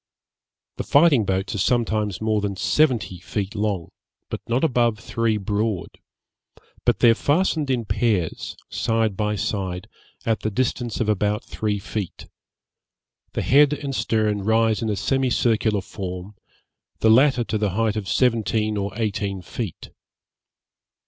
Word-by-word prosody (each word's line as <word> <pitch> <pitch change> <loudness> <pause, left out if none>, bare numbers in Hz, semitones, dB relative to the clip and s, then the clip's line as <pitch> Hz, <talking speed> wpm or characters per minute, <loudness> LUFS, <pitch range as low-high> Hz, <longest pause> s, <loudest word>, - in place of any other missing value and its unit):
The - - -2
fighting 140 -7 +4
boats 95 +4 -1
are 105 - -3
sometimes 110 -3 +1
more 110 -1 +1
than 100 -1 -2
seventy 115 - +1
feet 100 +2 -4
long, 105 -5 -2 0.4
but - - -4
not 120 +5 +1
above 120 -7 +2
three 115 0 -1
broad; 105 0 -2 0.9
but - - +2
they 120 - +7
are - - +5
fastened 150 +2 +1
in 125 -3 0
pairs, 100 -4 -1
side 115 -3 0
by 105 0 -1
side, 95 -3 -3 0.4
at 115 -1 +1
the 110 - -2
distance 120 +1 -1
of 110 - 0
about 105 0 +1
three 105 -1 -2
feet; 100 -1 -5 1.1
the - - -1
head 145 +2 +5
and 140 -2 -4
stern 110 -4 0
rise 110 +1 +2
in 110 - -1
a 105 - 0
semi 130 +7 +1
circular 110 -3 +1
form, 90 +1 -7 0.7
the 110 - +5
latter 130 +1 +5
to 110 -1 -2
the 105 -1 +1
height 110 -2 +1
of 105 -3 -3
seventeen 110 -3 +1
or 100 0 -2
eighteen 100 -3 -2
feet. 105 -2 -6
110 Hz, 145 wpm, -23 LUFS, 100-120 Hz, 1.1 s, they